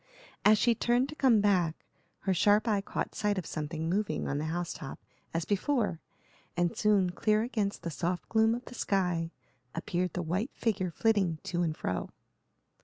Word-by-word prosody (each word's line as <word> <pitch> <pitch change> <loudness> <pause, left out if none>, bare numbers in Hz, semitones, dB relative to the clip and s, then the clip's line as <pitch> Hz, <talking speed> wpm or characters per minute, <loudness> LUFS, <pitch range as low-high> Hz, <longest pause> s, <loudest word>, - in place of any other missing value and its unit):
As 215 +1 +7
she 235 +3 +4
turned 245 +4 +1
to 300 - -7
come 250 -8 +4
back, 180 -6 +1 0.4
her 195 - +1
sharp 205 +5 +4
eye 205 -3 +2
caught - - -3
sight 205 -1 0
of 185 - -2
something 155 +1 -3
moving 185 -2 0
on 145 - -1
the 155 - -2
house 170 +2 -2
top 135 - -7 0.3
as 165 0 -1
before, 205 - 0 0.6
and 175 -1 +1
soon, 200 -4 +3
clear 215 +3 +2
against 215 -4 -2
the 170 - -3
soft 175 +3 -2
gloom 225 0 +3
of 245 - -7
the - - -10
sky, 180 -7 0 0.5
appeared 175 +1 -1
the 180 - -2
white 190 - -1
figure 195 -5 0
flitting 190 -3 +2
to 175 0 -1
and 160 -3 -1
fro. 90 - -2
190 Hz, 180 wpm, -30 LUFS, 170-215 Hz, 0.6 s, As